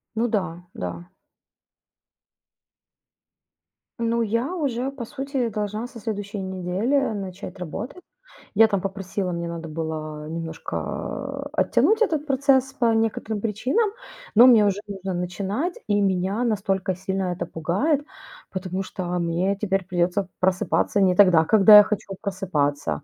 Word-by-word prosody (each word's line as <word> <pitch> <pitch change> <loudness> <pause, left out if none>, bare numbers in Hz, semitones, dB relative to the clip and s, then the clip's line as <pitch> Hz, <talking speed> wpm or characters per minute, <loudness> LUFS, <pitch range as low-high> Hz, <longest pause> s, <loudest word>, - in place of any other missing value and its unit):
Ну 235 +2 +1
да, 180 -5 -2
да. 85 0 -6 2.9
Ну, 230 0 +1
я 230 - -1
уже, 270 -5 -1
по 270 -3 -7
сути, 270 -1 -3
должна 210 +2 -3
со 245 -2 -10
следующей 205 -1 -4
недели 190 +7 -1 0.2
начать 190 -1 -7
работать. 215 - -6 0.5
Я 220 +2 +7
там 200 -3 -1
попросила, 195 -1 -3
мне 170 0 -3
надо 165 -1 -6
было 155 -1 -5
немножко, 165 0 -5
а, - - -5
оттянуть 440 +2 +3
этот 310 -8 +1
процесс 270 -1 +2
по 235 -4 +2
некоторым 225 -1 -1
причинам, 250 - 0 0.5
но 240 +3 +9
мне 225 -5 +7
уже 200 0 0
нужно 195 -2 -5
начинать. 195 - -2
И 205 -1 +2
меня 195 +4 0
настолько 195 -4 0
сильно 190 0 -2
это 175 - -3
пугает, 200 - 0 0.5
потому 185 0 -3
что 185 -1 -6
мне 175 +3 0
теперь 195 -2 -1
придется 180 +1 0
просыпаться 190 +2 +1
не 185 -2 +4
тогда, 180 -5 +6
когда 210 +1 +8
я 210 - +10
хочу 200 -2 -3
просыпаться. 150 -9 -1
195 Hz, 135 wpm, -24 LUFS, 180-230 Hz, 2.9 s, я